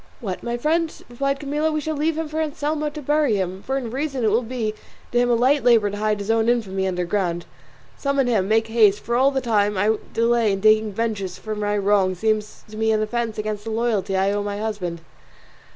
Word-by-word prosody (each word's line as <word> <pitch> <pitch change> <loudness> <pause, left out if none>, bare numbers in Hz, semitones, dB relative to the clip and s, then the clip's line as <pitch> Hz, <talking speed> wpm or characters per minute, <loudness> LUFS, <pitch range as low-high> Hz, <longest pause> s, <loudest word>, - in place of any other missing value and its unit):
"What, 195 -7 -4
my 235 0 -3
friend?" 320 +5 +1 0.2
replied 275 +3 -1
Camilla, 295 +2 -1
"we 305 - 0
shall 310 +1 -3
leave 310 +2 0
him 325 -1 -2
for 310 +1 -2
Anselmo 300 0 -2
to 295 0 -8
bury 295 -4 +2
him; 190 -1 -2
for 265 +5 -2
in 240 -4 -4
reason 270 -1 -2
it 215 - +3
will 225 +4 +3
be 230 -3 -3 0.4
to 240 - +2
him 245 0 +2
a 240 - +4
light 265 +5 +3
labour 225 -4 +4
to 205 - -5
hide 215 0 0
his 200 +2 -2
own 225 0 +2
infamy 195 -5 0
under 180 -1 -1
ground. 175 -2 -1 0.5
Summon 280 -1 +1
him, 215 -6 +1
make 220 +1 +3
haste, 215 -3 +3
for 235 - -2
all 265 +3 +5
the 270 -1 -1
time 210 -4 +1
I 215 +3 +2
delay 230 -2 +2
in 195 - -2
taking 215 0 +4
vengeance 200 -4 -3
for 215 +3 -5
my 210 0 -1
wrong 195 -2 +2
seems 215 +2 -1
to 215 - -9
me 220 0 +2
an 215 0 +2
offence 230 0 -2
against 215 -1 -3
the 225 - -5
loyalty 220 -4 0
I 195 +1 +2
owe 205 0 -1
my 205 0 -3
husband." 200 -6 -4
220 Hz, 230 wpm, -22 LUFS, 205-260 Hz, 0.5 s, all